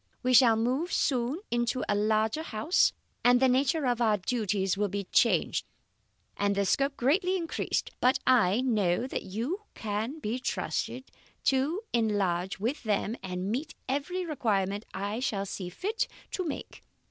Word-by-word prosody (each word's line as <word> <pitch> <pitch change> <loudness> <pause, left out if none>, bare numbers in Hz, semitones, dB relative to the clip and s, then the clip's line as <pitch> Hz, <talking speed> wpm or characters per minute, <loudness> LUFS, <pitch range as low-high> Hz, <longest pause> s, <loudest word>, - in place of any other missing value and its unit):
We 255 0 +2
shall 240 -2 +7
move 255 +10 0
soon 260 +5 0
into 240 +2 0
a 205 - +2
larger 215 +6 +1
house, 310 +3 +2 0.3
and 245 0 +6
the 265 - +5
nature 275 +4 +2
of 245 -1 +1
our 215 -3 +3
duties 195 -2 0
will 205 +1 0
be 200 +1 -3
changed - - +3 0.7
and 200 0 +1
their 200 0 +1
scope 275 +8 +1
greatly 360 - +2
increased; 335 -2 -2
but 255 +1 +4
I 235 -4 +4
know 215 -5 +1
that 260 - -3
you 250 - -4
can 220 +6 -3
be 240 -3 -3
trusted 255 +1 -3 0.3
to 275 +9 +1
enlarge 195 -5 0
with 240 +9 -2
them 215 0 0
and 185 +1 -3
meet 275 +7 -3
every 290 +7 -2
requirement 205 - -1
I 200 +4 -3
shall 210 -6 -1
see 185 -2 -5
fit 405 - -2 0.2
to 370 - -2
make. 300 - -6
235 Hz, 155 wpm, -29 LUFS, 205-275 Hz, 0.7 s, shall